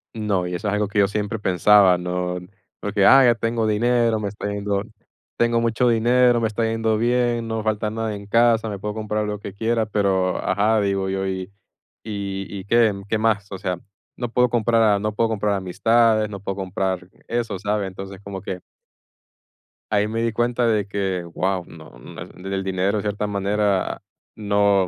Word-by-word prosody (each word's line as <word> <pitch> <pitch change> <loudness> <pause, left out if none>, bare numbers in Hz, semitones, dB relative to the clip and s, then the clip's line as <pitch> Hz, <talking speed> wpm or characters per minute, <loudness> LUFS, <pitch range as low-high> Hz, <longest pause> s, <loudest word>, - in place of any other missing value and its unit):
No, 100 -5 -1
y 90 - -3
eso 105 +4 -2
es 100 - -1
algo 105 -1 0
que 105 +1 -1
yo 100 0 +4
siempre 105 +1 -2
pensaba, 95 0 +5
¿no? 90 0 -2 0.4
Porque, 105 -1 +1
ah, 135 0 +8
ya 120 -1 +5
tengo 115 -1 -1
dinero, 115 +1 +2
me 105 -2 -3
está 105 +1 -6
yendo 100 -1 -1 0.6
tengo 120 0 +2
mucho 115 +1 +2
dinero, 120 +1 +4
me 115 - +1
está 110 +1 -2
yendo 115 -1 0
bien, 120 0 +1
no 110 - -2
me 110 - -3
falta 110 -1 -1
nada 110 -1 -3
en 100 - -9
casa, 115 +1 +3
me 100 -2 -5
puedo 105 +1 -4
comprar 105 0 -2
lo 105 0 -3
que 100 -1 -8
quiera, 115 +1 0
pero, 95 -3 +1
ajá, 105 +3 +2
digo 100 -1 0
yo. 95 0 -2
¿Y 95 +1 -4 0.5
y 100 -2 -4
y - - -12
qué 115 -1 +4 0.2
qué 110 - +1
más? 105 -2 0
O 95 - -4
sea, 90 -2 -3 0.4
no 120 -2 -4
puedo 125 +1 +3
comprar 115 -1 +2
a 105 -2 +4
no 105 0 -2
puedo 115 +1 +1
comprar 105 -1 0
amistades, 110 +3 +2
no 100 - -7
puedo 100 0 -4
comprar 95 -1 -3 0.2
eso, 115 -5 -2
¿sabes? 105 -1 -1
Entonces, 95 +1 -9
como 100 -1 -6
que 95 -3 -5 1.3
ahí 105 0 +2
me 115 +1 -2
di 115 - +1
cuenta 120 +1 0
de 105 -3 +1
que, 95 -3 -2
guau, 90 +2 -2
no 80 -1 -13
no - - -10 0.3
e - - -3
el 95 - -2
dinero 95 +2 0
en 105 - -1
cierta 105 0 -2
manera 100 -1 0 0.3
no 100 -2 +2
105 Hz, 195 wpm, -22 LUFS, 95-115 Hz, 1.3 s, ah